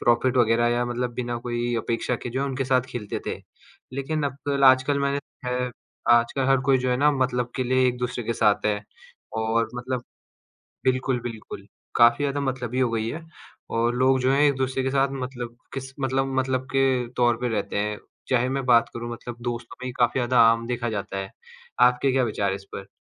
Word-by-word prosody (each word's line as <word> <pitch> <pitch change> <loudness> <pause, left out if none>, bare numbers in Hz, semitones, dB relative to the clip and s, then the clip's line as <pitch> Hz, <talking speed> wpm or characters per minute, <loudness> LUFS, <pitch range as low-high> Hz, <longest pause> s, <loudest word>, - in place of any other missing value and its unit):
Profit 120 +2 +2
वग़ैरह 120 -1 +4
या 120 +1 +1
मतलब 120 0 -2
बिना 120 -1 -3
कोई 120 0 -1
अपेक्षा 115 +2 -1
के - - -4
जो 130 +3 -2
है, 140 - 0
उनके 135 -1 -2
साथ 130 0 +3
खेलते 105 -5 -5
थे। - - -2 0.6
लेकिन 140 +3 -2
अब 140 +1 -3
आजकल 130 +2 +5
मैंने 140 0 +1
देखा 125 -3 -6
है, 125 0 -1 0.4
आजकल 120 +3 +3
हर 135 -1 +4
कोई 135 -1 +5
जो 125 0 -1
है 125 - +2
ना 145 +3 +4
मतलब 125 -2 0
के 130 - 0
लिए 130 +1 +3
एक-दूसरे 125 -1 -3
के 115 - -1
साथ 105 -2 +2
है 105 -1 +1 0.6
और 110 0 +1
मतलब 125 0 -3 0.8
बिल्कुल, 130 0 +1
बिल्कुल। 115 -2 -7 0.3
काफ़ी 120 +4 +5
ज़्यादा 140 0 -1
मतलबी 130 -2 -2
हो 125 - +3
गई 115 -1 -1
है 160 +4 -6 0.4
और 120 +1 +1
लोग 130 +1 +3
जो 130 +1 +2
हैं, 140 - +3
एक-दूसरे 130 -2 +1
के 130 - 0
साथ 135 0 +3 0.2
मतलब 120 -2 -6 0.2
किस 135 0 -6
मतलब, 135 0 0
मतलब 130 0 -1
के 130 -2 +2
तौर 120 -2 +3
पे 125 - 0
रहते 105 -3 -2
हैं। 105 0 -1 0.3
चाहे 125 -1 +2
मैं 135 0 -2
बात 120 -2 +5
करूँ 120 0 -5
मतलब 120 0 -7
दोस्तों 120 -1 -5
में 130 - -3
ही - - -3
काफ़ी 120 +2 +3
ज़्यादा 125 0 +4
आम 115 0 -1
देखा 120 -1 -2
जाता 100 -2 -4
है, 95 0 -5 0.5
आपके 125 +2 +4
क्या 130 0 +2
विचार 105 -3 0
हैं 95 - -1
इस 100 - -10
पर? 95 0 -7
125 Hz, 205 wpm, -25 LUFS, 120-130 Hz, 0.8 s, आजकल